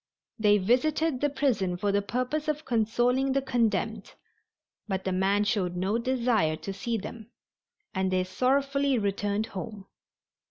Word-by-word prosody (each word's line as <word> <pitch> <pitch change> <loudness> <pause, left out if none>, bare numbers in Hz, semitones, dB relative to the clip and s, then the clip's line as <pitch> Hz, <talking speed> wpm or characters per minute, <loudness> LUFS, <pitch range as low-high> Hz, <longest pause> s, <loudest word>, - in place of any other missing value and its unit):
They 210 -1 +5
visited 260 +7 +1
the 290 - +2
prison 250 -11 0
for 200 +2 0
the 200 0 +2
purpose 255 +8 -2
of 305 0 -2
consoling 245 +3 +1
the 275 - +2
condemned 225 -4 -1 0.7
but 190 -2 -2
the 190 - -1
man 195 +2 +2
showed 200 -5 0
no 190 +5 0
desire 235 -10 +1
to 195 +5 -6
see 230 +4 -2
them, 220 +2 -8 0.6
and 190 -1 0
they 185 0 +1
sorrowfully 275 +7 +1
returned 205 0 -1
home. 195 +1 -6
220 Hz, 145 wpm, -28 LUFS, 195-260 Hz, 0.7 s, They